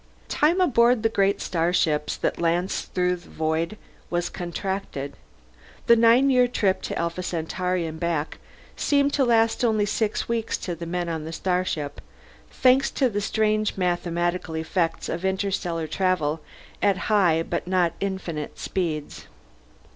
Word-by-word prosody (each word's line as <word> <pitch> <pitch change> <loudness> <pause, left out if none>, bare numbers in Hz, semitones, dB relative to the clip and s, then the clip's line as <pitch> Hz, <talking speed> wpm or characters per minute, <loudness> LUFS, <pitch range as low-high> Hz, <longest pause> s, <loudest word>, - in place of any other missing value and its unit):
Time 325 +5 +2
aboard 240 -8 +4
the 225 - +3
great 200 -2 +1
starships 165 -3 0
that - - -1
lanced 175 +3 0
through 180 0 +2
the 175 - -17
void 160 +5 -1 0.3
was 175 0 -1
contracted; 175 -5 -4 0.7
the 235 - +7
nine 235 +4 +5
year 250 -1 +5
trip 200 -6 +1
to - - -4
Alpha 170 +2 -2
Centauri 180 +1 -2
and 160 0 -6
back 165 -2 -2 0.4
seemed 285 0 +2
to 280 - +3
last 230 -1 +3
only 215 -3 +2
six 210 +1 -1
weeks 230 -1 -1
to 175 - -4
the 170 0 -6
men 175 0 -2
on 160 -2 -3
the 180 +3 -1
ship, 145 -2 -4 0.5
thanks 260 +1 +3
to 260 -4 +1
the 205 0 -1
strange 215 0 0
mathematical 175 -2 -1
effects 165 +1 -1
of 170 +2 -4
interstellar 190 -3 -1
travel 165 -3 0 0.4
at 200 -2 +3 0.2
high 170 -6 +4
but - - -3
not 180 -2 +2
infinite 180 -6 -4
speeds. 160 -6 -3
180 Hz, 145 wpm, -25 LUFS, 165-215 Hz, 0.7 s, the